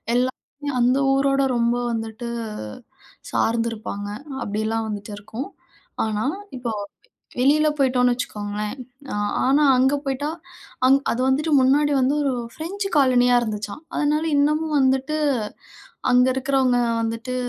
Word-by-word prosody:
எல்லாமே 250 +1 +3 0.5
அந்த 245 +2 +3 0.2
ஊரோட 275 0 +2
ரொம்ப 235 0 +2 0.2
வந்துட்டு 225 +1 -4 1.1
சார்ந்திருப்பாங்க, 225 -3 -1 0.3
அப்படிலாம் 220 +2 -1
வந்துட்டு 210 0 -5
இருக்கும். 220 +6 -6 0.6
ஆனா, 215 -1 -1 0.3
இப்போ 245 -2 -3 0.6
வெ - - -6
வெளியில 295 +4 +4
போயிட்டோம்னு 250 -2 +3
வச்சுக்கோங்களேன், 210 -2 -4 0.3
நான் 205 -3 -1 0.2
ஆனா 280 +3 +4
அங்கே 265 +3 +3
போய்ட்டா 275 +2 -2 0.6
அங் 270 +1 +6
அது 240 - -1
வந்துட்டு 300 +4 +1
முன்னாடி 285 +3 +3
வந்து, 260 +3 +2
ஒரு 275 -2 +1 0.2
ஃப்ரெஞ்ச் 390 +6 -4
காலனியா 250 -3 +4
இருந்துச்சாம். 215 +3 -4
அதனால 300 +1 +1
இன்னமும் 305 +2 +1
வந்துட்டு 265 +2 +2 1.0
அங்க 250 +1 +5
இருக்கிறவங்க 265 -1 +2 0.2
வந்துட்டு, 230 +3 -3
255 Hz, 115 wpm, -23 LUFS, 225-275 Hz, 1.1 s, அங்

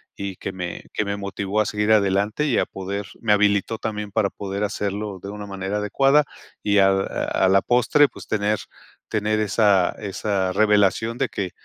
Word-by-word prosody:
y 100 -1 -5
que 95 - -5
me 90 -2 -6
que 105 - -1
me 100 0 -2
motivó 100 +1 -2
a - - 0
seguir 105 +1 0
adelante 105 +5 +2
y 135 -6 +1
a - - +2
poder 100 +1 -5 0.2
me 115 - +1
habilitó 105 +1 +2
también 105 -2 -4
para 100 -1 +1
poder 100 +1 -4
hacerlo 100 -1 -3
de 100 - -6
una 105 0 -7
manera 95 +1 -3
adecuada 135 +8 +3 0.4
y 100 -1 +2
al 95 0 +4
a - - 0
a - - +5
la 95 +1 +5
postre, 125 +6 +4
pues, - - -12
tener 105 0 0 0.5
tener 110 0 0
esa 100 -3 +3
esa 100 -2 -2
revelación 105 +3 +2
de 135 -3 0
que, 95 -3 -4
105 Hz, 185 wpm, -23 LUFS, 100-110 Hz, 0.5 s, a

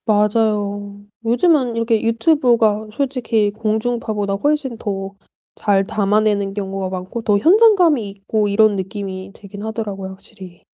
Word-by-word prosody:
맞아요. 205 -1 0 0.2
요즘은 250 +1 +2
이렇게 230 -1 +1
유튜브가 230 -3 +2
솔직히 235 -4 0
공중파보다 215 -1 -2
훨씬 275 +2 -1
더 195 -3 -5 0.4
잘 200 -2 +1
담아내는 205 0 0
경우가 195 -1 -4
많고 185 +5 -5
더 205 -2 +3
현장감이 345 - +4
있고 205 +2 -2
이런 205 0 +3
느낌이 190 -1 -6
들긴 200 -1 -11
하더라고요 210 -4 -5
확실히. 185 -2 -13
210 Hz, 315 characters per minute, -19 LUFS, 200-230 Hz, 0.4 s, 현장감이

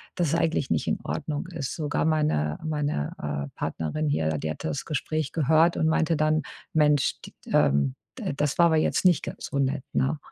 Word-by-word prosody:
dass 175 -3 +1
es 160 - +1
eigentlich 165 -4 +1
nicht 80 - 0
in - - 0
Ordnung 145 - -3
ist. 165 -7 -4
Sogar 150 -2 -1
meine 150 - +1
meine, 150 - -1
äh, 70 -1 -3
Partnerin 150 - -2
hier, 80 - +1
die 80 - -3
hat - - -7
das 80 -2 -3
Gespräch 155 -1 -2
gehört 160 +3 +4
und 160 - +2
meinte 160 +1 +2
dann: 155 0 +2 0.3
„Mensch 150 -3 +3
d - - -12 0.2
ähm, 70 -1 +3 0.2
d - - -2
das 145 -1 0
war 170 - +6
aber 160 -1 +3
jetzt 155 - +1
nicht 180 -4 +5
ganz - - -6
so 140 - 0
nett, 135 0 0
ne?“ 135 +4 +1
150 Hz, 200 wpm, -26 LUFS, -, 0.3 s, war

